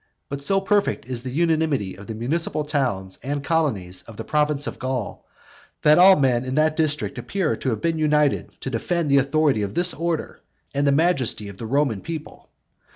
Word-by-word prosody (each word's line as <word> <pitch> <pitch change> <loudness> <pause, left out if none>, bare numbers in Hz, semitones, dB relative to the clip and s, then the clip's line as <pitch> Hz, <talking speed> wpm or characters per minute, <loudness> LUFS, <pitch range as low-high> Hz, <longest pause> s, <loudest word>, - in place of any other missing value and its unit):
But 140 0 -5
so 195 +7 +2
perfect 200 - 0
is 125 -1 -4
the 130 - -6
unanimity 155 - 0
of 100 +2 -12
the 110 - -5
municipal 150 +6 -1
towns 125 -11 -2
and 140 +2 -3
colonies 115 - -1
of 115 -2 -11
the 115 - -5
province 150 +2 0
of - - -6
Gaul, 130 -4 -4 0.6
that 150 +2 +6
all 190 +1 +8
men 130 -5 +2
in 130 0 -4
that 155 0 +2
district 155 -2 -1
appear 190 -5 -1
to 130 - -2
have 110 +2 -3
united 150 -3 +2
together - - -29
to - - -3
defend 155 +6 -1
the 140 - +6
authority 140 -3 +2
of 100 +5 -4
this 175 +1 +5
order, 165 -1 -3 0.3
and 140 +1 +1
the - - +4
majesty 140 - +1
of 100 - -11
the 115 - -6
Roman 135 -5 0
people. 160 -2 -8
145 Hz, 195 wpm, -23 LUFS, 120-160 Hz, 0.6 s, all